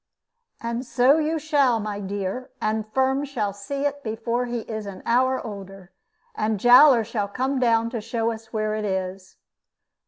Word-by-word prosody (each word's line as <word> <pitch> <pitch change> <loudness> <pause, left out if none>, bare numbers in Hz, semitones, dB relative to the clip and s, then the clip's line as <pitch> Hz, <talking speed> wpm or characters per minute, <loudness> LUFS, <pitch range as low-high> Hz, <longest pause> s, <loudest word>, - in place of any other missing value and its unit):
"And 235 +1 -3
so 265 +4 +3
you 315 +1 0
shall, 285 -6 +2
my 210 -1 -4
dear, 200 +4 -4
and 215 0 -2
Firm 265 +3 +1
shall 225 -8 -2
see 275 +8 -4
it 285 0 -2
before 230 +2 -2
he 240 -1 -3
is 215 -2 -6
an 195 -2 -9
hour 260 +2 +2
older, 195 -3 -9 0.4
and 215 -1 -1
Jowler 245 +1 +7
shall 215 -2 -2
come 260 +6 -1
down 230 -2 +2
to 235 -3 -3
show 230 +1 -1
us 225 0 -9
where 215 -1 -1
it 215 0 -2
is." 190 -1 -4
230 Hz, 165 wpm, -24 LUFS, 210-255 Hz, 0.4 s, Jowler